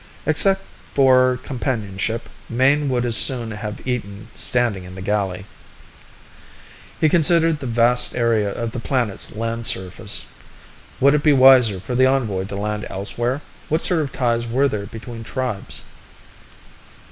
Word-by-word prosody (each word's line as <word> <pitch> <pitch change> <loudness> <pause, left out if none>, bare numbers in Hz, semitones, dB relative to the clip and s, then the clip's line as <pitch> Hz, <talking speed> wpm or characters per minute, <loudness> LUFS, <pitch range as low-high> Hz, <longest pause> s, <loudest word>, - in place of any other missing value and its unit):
Except 195 +5 +3 0.3
for 130 -2 +4
companionship, 115 -4 -3 0.2
Mayne 140 +4 +2
would 125 -1 0
as 120 -2 +3
soon 120 -3 +3
have 105 0 -7
eaten 110 -4 -4
standing 120 -6 +1
in 90 0 -11
the 95 - -8
galley. 100 -2 -2 1.5
He 155 - +4
considered 165 0 +3
the 135 - -5
vast 120 +1 +2
area 115 -4 +1
of 115 +2 -4
the 125 - -5
planet's 115 -4 -3
land 115 +1 -2
surface. 95 -1 -2 0.7
Would 140 +2 +5
it 150 - +2
be 150 -1 +4
wiser 130 -7 +6
for 95 +7 -6
the 130 +1 +4
envoy 110 -8 0
to 100 - -7
land 105 +1 -3
elsewhere? 120 +7 -3 0.3
What 160 +2 +1
sort 175 -3 +2
of 140 -3 -4
ties 120 -2 -1
were 130 +5 +2
there 105 -5 -4
between 115 +2 -9
tribes? 125 -4 -4
120 Hz, 145 wpm, -21 LUFS, 105-130 Hz, 1.5 s, wiser